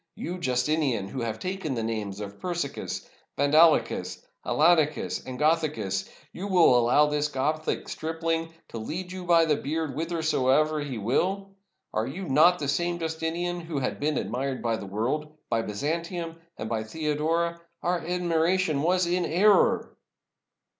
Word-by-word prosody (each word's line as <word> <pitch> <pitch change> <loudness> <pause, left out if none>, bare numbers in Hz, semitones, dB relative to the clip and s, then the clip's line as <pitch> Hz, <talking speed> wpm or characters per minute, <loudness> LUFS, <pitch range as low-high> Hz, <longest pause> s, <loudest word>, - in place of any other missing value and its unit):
You, 180 +2 -5
Justinian, 130 - 0
who 130 - -4
have 110 -2 -2
taken 185 - -3
the 115 - -2
names 105 -3 -3
of 100 -1 -7
Persicus, 175 -6 -4 0.3
Vandalicus, 155 +3 +3 0.2
Alanicas, 155 -1 +2
and 130 -1 -5
Gothicus, 150 - 0
— - - -30
you 190 +3 -5
will 175 -9 +5
allow 120 +5 +5
this 150 0 0
Gothic 150 +3 -1
stripling 165 +1 -2 0.2
to 115 - -6
lead 180 +11 -5
you 185 -1 -6
by 170 -1 +5
the 155 -2 +2
beard 155 +1 -3
whither 165 +1 -3
soever 155 +1 +2
he 140 -4 -4
will? 190 - 0 0.4
Are 110 +2 0
you 180 +8 -5
not 160 +6 +5
the 145 - -3
same 175 +4 0
Justinian 165 +2 -2
who 165 -3 -5
has 130 -2 -2
been 150 +1 0
admired 130 +1 -2
by 115 -1 +1
the 100 - -7
world, 150 +10 -2
by 115 -1 +2
Byzantium, 165 - -3 0.2
and 110 - -4
by 110 -1 -1
Theodora? 160 +6 -1 0.2
Our 175 0 +1
admiration 170 -2 +1
was 180 +3 +2
an 175 +1 0
error!" 200 +5 +3
155 Hz, 155 wpm, -27 LUFS, 130-170 Hz, 0.4 s, will